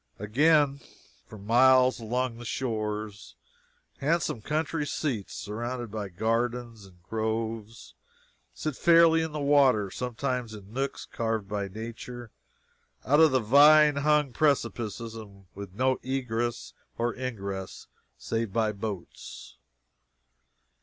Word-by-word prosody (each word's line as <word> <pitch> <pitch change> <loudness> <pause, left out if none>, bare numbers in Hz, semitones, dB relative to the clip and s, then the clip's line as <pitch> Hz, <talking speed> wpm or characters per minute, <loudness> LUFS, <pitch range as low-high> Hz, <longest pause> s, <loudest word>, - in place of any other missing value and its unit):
Again, 140 +6 +3 0.5
for 110 - -11
miles 125 +5 +4
along 120 +1 -2
the - - -8
shores, 110 -3 -4 0.6
handsome 150 -5 0
country 155 +4 -1
seats, 125 -12 -3
surrounded 120 +2 -5
by 105 -2 -4
gardens 115 +2 -2
and 90 -2 -21
groves, 110 +1 -4 0.6
sit 155 -3 -4
fairly 165 0 +5
in 160 -1 -3
the 150 - -4
water, 135 -8 +3
sometimes 125 -2 -3
in 100 0 -13
nooks 135 +2 -3
carved 110 -3 -3
by 100 -1 -3
Nature 115 +3 -8 0.7
out 145 +3 +4
of 160 -1 +7
the 130 -1 +2
vine 145 +5 +6
hung 150 -2 +2
precipices, 115 -6 -1
and 100 -3 -11
with 100 -1 -9
no 130 +3 +1
ingress 120 -3 -3 0.2
or 120 0 0
egress 100 -7 -6 0.3
save 115 -2 -3
by 110 0 +1
boats. 100 -3 -8
120 Hz, 115 wpm, -27 LUFS, 110-135 Hz, 0.7 s, of